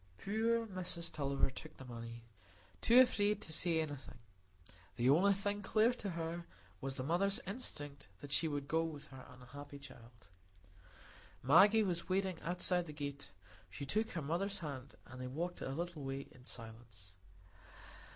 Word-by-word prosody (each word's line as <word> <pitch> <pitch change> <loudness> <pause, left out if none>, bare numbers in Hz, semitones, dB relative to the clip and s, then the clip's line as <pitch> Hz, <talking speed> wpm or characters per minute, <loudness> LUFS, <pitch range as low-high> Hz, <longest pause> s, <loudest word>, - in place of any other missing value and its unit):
Poor 225 +3 +1
Mrs 180 -4 -3
Tulliver 140 -2 +1
took 155 +4 -10
the 130 - -9
money, 115 -1 -7 0.6
too 250 +3 +8
frightened 210 -3 +1
to 160 - -4
say 165 0 +5
anything. 145 -5 -6 0.8
The 125 +2 +4
only 190 +7 +6
thing 205 +1 -1
clear 220 +4 +3
to 210 -4 -4
her 170 0 -4 0.3
was 135 0 -2
the 130 - -3
mother's 195 - +2
instinct 145 - -4
that 145 - -9
she 165 - +3
would 145 -2 -2
go 165 +2 +2
with 155 -3 -5
her 130 -1 -11
unhappy 135 +3 -10
child. 115 -5 -14 1.2
Maggie 200 - +7
was 175 -3 -1
waiting 190 -2 0
outside 180 0 +1
the 150 - -7
gate; 140 -9 -5 0.4
she 140 +10 -6
took 215 +10 +1
her 165 - -2
mother's 175 +7 0
hand 140 -6 -6
and 130 +1 -9
they 125 - -3
walked 170 +7 -3
a - - -3
little 170 +2 -3
way 135 0 -3
in 125 0 -17
silence. 110 -6 -7
160 Hz, 160 wpm, -37 LUFS, 135-190 Hz, 1.2 s, too